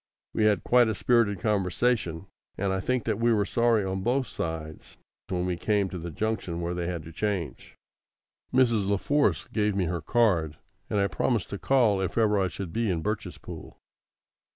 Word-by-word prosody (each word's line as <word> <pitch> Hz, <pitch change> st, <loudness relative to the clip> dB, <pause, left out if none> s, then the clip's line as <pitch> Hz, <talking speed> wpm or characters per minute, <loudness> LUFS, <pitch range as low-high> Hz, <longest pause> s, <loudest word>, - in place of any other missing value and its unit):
We 110 Hz, -, +2 dB
had 105 Hz, -6 st, +3 dB
quite 125 Hz, -1 st, +5 dB
a 110 Hz, -, -1 dB
spirited 110 Hz, -4 st, +2 dB
conversation, 100 Hz, -3 st, 0 dB, 0.3 s
and 95 Hz, 0 st, 0 dB
I 95 Hz, -, 0 dB
think 125 Hz, +5 st, 0 dB
that 110 Hz, -2 st, -1 dB
we 120 Hz, +1 st, +3 dB
were 105 Hz, -3 st, +2 dB
sorry 115 Hz, -2 st, +2 dB
on 95 Hz, 0 st, -2 dB
both 125 Hz, +6 st, +1 dB
sides 80 Hz, -6 st, -6 dB, 0.3 s
when 90 Hz, -1 st, -1 dB
we 90 Hz, -1 st, -1 dB
came 100 Hz, +1 st, +1 dB
to 90 Hz, -, -6 dB
the 85 Hz, +1 st, -5 dB
junction 90 Hz, -1 st, -2 dB
where 85 Hz, 0 st, -2 dB
they 85 Hz, -1 st, -3 dB
had 85 Hz, -3 st, -3 dB
to 80 Hz, -, -10 dB
change. 90 Hz, -, -3 dB, 0.8 s
Mrs. 120 Hz, -6 st, +3 dB
La 100 Hz, 0 st, +2 dB
Force 145 Hz, +8 st, +1 dB
gave 105 Hz, -2 st, +1 dB
me 95 Hz, -2 st, +1 dB
her 85 Hz, 0 st, -2 dB
card, 85 Hz, -7 st, +1 dB, 0.3 s
and 105 Hz, -, +1 dB
I 100 Hz, -, +3 dB
promised 115 Hz, -1 st, -1 dB
to 100 Hz, -, -4 dB
call 115 Hz, -8 st, +3 dB
if 95 Hz, -, -3 dB
ever 105 Hz, -3 st, +3 dB
I 95 Hz, -, +2 dB
should 90 Hz, +1 st, -6 dB
be 115 Hz, -1 st, 0 dB
in 85 Hz, -3 st, -1 dB
Birchespool. 105 Hz, 0 st, -5 dB
100 Hz, 190 wpm, -27 LUFS, 90-115 Hz, 0.8 s, quite